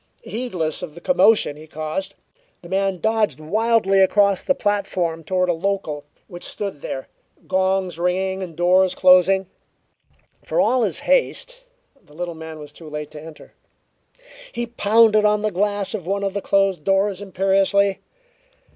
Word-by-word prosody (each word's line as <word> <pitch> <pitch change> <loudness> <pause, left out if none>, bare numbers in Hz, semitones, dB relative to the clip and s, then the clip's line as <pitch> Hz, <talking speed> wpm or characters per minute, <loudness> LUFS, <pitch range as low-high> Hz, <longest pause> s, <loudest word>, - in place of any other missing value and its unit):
Heedless 185 -11 -3
of 165 -4 -7
the - - -9
commotion 215 - +3
he 155 +1 -13
caused, 155 +6 -5 0.5
the 170 - -11
man 195 -1 0
dodged 215 - 0
wildly 210 +3 +2
across 200 0 +3
the 275 - +1
platform 185 -5 -1
toward 185 +3 0
a 175 - +2
local, 165 -5 -3 0.2
which 175 -2 -10
stood 195 -8 -5
there, 135 - -5 0.4
gongs 190 -2 0
ringing 190 +2 -1
and 175 -4 -7
doors 180 +2 +3
closing. 185 +1 +5 1.0
For - - -2
all 255 - +3
his - - -1
haste, - - 0 0.5
the 150 - -20
little 175 +1 -4
man 160 0 -9
was 150 -1 -11
too 160 0 -12
late 150 0 -6
to 150 - -10
enter. 160 0 -13 1.0
He 240 - -3
pounded 220 -1 +3
on 210 0 +2
the 215 - 0
glass 205 +1 -1
of 190 -6 -5
one 200 +1 -1
of 195 -1 -1
the 200 - -3
closed 195 -5 +1
doors 195 +1 +1
imperiously. 195 0 +1
190 Hz, 155 wpm, -21 LUFS, 170-205 Hz, 1.0 s, closing